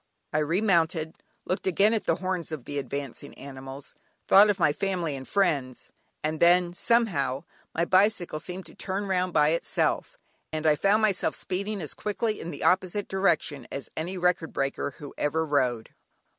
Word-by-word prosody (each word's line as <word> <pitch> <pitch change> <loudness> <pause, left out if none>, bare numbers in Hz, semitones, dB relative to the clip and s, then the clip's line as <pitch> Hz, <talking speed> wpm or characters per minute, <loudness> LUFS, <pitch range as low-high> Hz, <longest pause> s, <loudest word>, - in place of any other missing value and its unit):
I 155 - +2
remounted, 165 -1 +1 0.3
looked 185 +1 -2
again 200 +4 +4
at 220 - -1
the 165 - +2
horns 185 -2 -3
of 150 -6 -6
the 145 0 -3
advancing 140 +1 -6
animals, 135 0 -9 0.3
thought 205 +2 +8
of 205 - +2
my 150 -5 +3
family 175 -4 -1
and 130 -1 -8
friends, 145 -11 0 0.3
and 155 +1 -1
then, 175 0 +4
somehow, 180 - +1 0.3
my 170 - +2
bicycle 185 -3 +2
seemed 180 +3 -7
to - - -13
turn 195 +2 -3
round 185 -1 0
by 150 -2 +4
itself, 165 +1 0 0.3
and 155 0 -3
I 155 -1 +5
found 200 +7 +3
myself 205 -4 +1
speeding 200 +2 -3
as 150 - -4
quickly 215 +1 -2
in 170 - -5
the - - -6
opposite 190 +2 +2
direction 175 -8 0
as 140 - -6
any 175 +4 -3
record 180 -2 +1
breaker 135 0 -2
who 145 -2 -9
ever 160 +2 +1
rode. 125 -6 0
170 Hz, 170 wpm, -27 LUFS, 145-190 Hz, 0.3 s, thought